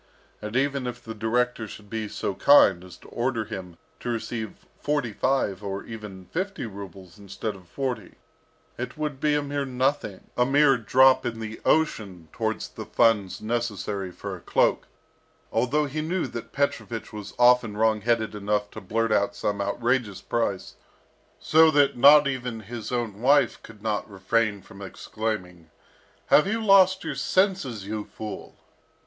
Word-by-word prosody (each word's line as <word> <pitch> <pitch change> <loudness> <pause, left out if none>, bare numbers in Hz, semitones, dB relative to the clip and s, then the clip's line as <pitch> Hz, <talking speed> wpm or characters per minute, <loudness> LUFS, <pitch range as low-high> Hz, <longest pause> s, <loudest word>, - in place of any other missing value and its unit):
And 105 +2 -6
even 135 -1 0
if 125 0 -6
the 110 - -6
director 115 +1 0
should 105 0 -11
be 110 0 -4
so 100 - -3
kind 95 -5 +5
as 90 -1 -12
to - - -17
order 120 -2 -1
him 95 -5 -8 0.2
to - - -5
receive 115 -2 -4
forty 145 -7 -1
five 105 -6 0
or 100 -1 -4
even 105 -5 -9
fifty 195 - -3
rubles 95 -2 -10
instead 100 +2 -5
of 90 -2 -16
forty, 130 +4 -4 0.6
it 125 +5 -5
would 150 -3 -3
be 150 0 +2
a 145 - 0
mere 145 0 -2
nothing, 130 -5 -2
a 125 - +3
mere 135 +1 +4
drop 130 +3 +4
in 115 -1 -4
the 110 0 -7
ocean 100 - 0
towards - - -2
the - - -9
funds 105 -5 +2
necessary 105 -4 -2
for 90 - -7
a - - -12
cloak, - - +1 0.6
although 150 +5 +1
he 150 +2 -3
knew 170 +3 -1
that 115 - -7
Petrovich 120 -5 -2
was 105 -2 -8
often 120 -3 +4
wrong 110 -1 +2
headed 115 -1 0
enough 105 0 -1
to 110 - -8
blurt 115 +4 -1
out 100 -1 +2
some 100 -1 -2
outrageous 115 0 0
price, 100 -2 -2 0.6
so 160 +1 +5
that 145 -2 +4 0.4
even 125 -4 -3
his 115 +2 -7
own 115 -4 -3
wife 140 +3 +3
could 110 -2 -14
not 110 -1 -2
refrain 100 +1 0
from 100 -2 -14
exclaiming, 95 -4 -5 0.6
"Have 150 - +5
you 220 +3 0
lost 195 -3 +5
your - - -3
senses, 185 - 0
you 105 +1 -4
fool?" 110 -1 -8
115 Hz, 160 wpm, -25 LUFS, 105-135 Hz, 0.6 s, kind